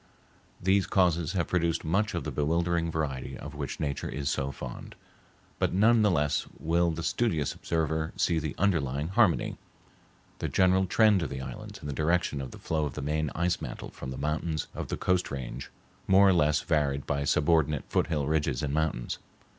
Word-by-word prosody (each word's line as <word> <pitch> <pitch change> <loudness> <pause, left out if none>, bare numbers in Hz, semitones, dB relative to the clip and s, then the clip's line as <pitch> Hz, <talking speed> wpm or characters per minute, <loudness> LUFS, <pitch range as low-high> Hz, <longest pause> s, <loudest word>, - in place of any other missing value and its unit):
These 95 +1 +2
causes 85 -3 +2
have 85 -5 0
produced 85 -3 0
much 100 +7 +1
of - - -2
the - - -4
bewildering 85 +2 +1
variety 75 -5 -3
of 70 - -8
which 70 -3 -5
nature 70 -3 -2
is 70 0 -2
so 70 0 -1
fond, - - -8 0.6
but - - +1
none 110 +4 +5
the 105 - +4
less 75 -5 +1
will 85 +2 +1
the 80 0 -3
studious 85 - 0
observer 80 0 -1
see 85 -2 +1
the 75 -2 -4
underlying 75 -6 0
harmony—the 95 -3 -2
general 95 0 +3
trend 105 -1 +4
of 80 - -2
the 65 -1 -5
islands 65 - -7
in - - -5
the 70 - -3
direction 80 -1 +1
of 65 - -5
the - - -11
flow 80 -1 -1
of 70 - -5
the - - -4
main 75 +1 0
ice 90 +2 0
mantle - - -6
from 65 - -7
the 65 - -5
mountains 75 +1 -1
of - - -5
the - - -3
Coast 90 -1 +1
Range, 65 -1 -6 0.4
more 95 +1 +6
or - - +5
less 75 -3 +3
varied 70 -3 0
by 70 0 -1
subordinate 75 0 +2
foothill 75 -4 0
ridges 75 -4 0
and 70 -1 -1
mountains. 80 -6 -1
80 Hz, 185 wpm, -28 LUFS, 70-90 Hz, 0.6 s, more